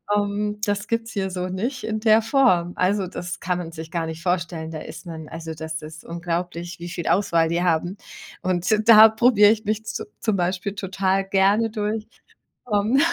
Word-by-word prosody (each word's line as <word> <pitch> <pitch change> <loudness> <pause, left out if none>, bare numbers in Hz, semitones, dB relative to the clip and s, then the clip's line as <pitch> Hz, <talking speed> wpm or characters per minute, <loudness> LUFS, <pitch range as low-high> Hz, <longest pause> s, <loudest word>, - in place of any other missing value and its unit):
Ähm. 210 0 -1
Das 205 0 -2
gibt's 230 -1 -2
hier 190 -1 -1
so 180 0 -3
nicht 235 +8 -3
in 220 0 -2
der 220 0 +5
Form. 220 -8 +2
Also, 190 +1 +1
das 175 0 -6
kann 180 0 -1
man 165 -2 -6
sich 160 0 -9
gar 170 -1 -1
nicht 160 0 -6
vorstellen, 170 -2 -2
da 155 - -5
ist - - -10
man 160 -2 -8
also, 165 0 -6
das 160 0 -6
ist 155 +1 -10
unglaublich, 170 0 -4
wie 175 +1 -6
viel 170 -1 -5
Auswahl 170 -4 +2
die 170 +1 0
haben. 175 +3 0 0.4
Und 185 +3 +1
da 220 -1 +10
probiere 220 -2 +5
ich 220 -1 -1
mich 215 +1 -2
zu 215 - -4
zum 215 -3 0
Beispiel 185 +2 -2
total 195 0 0
gerne 200 +4 +3
durch. 215 0 -3 0.7
Ähm, 215 +7 +3
190 Hz, 185 wpm, -23 LUFS, 170-210 Hz, 0.7 s, da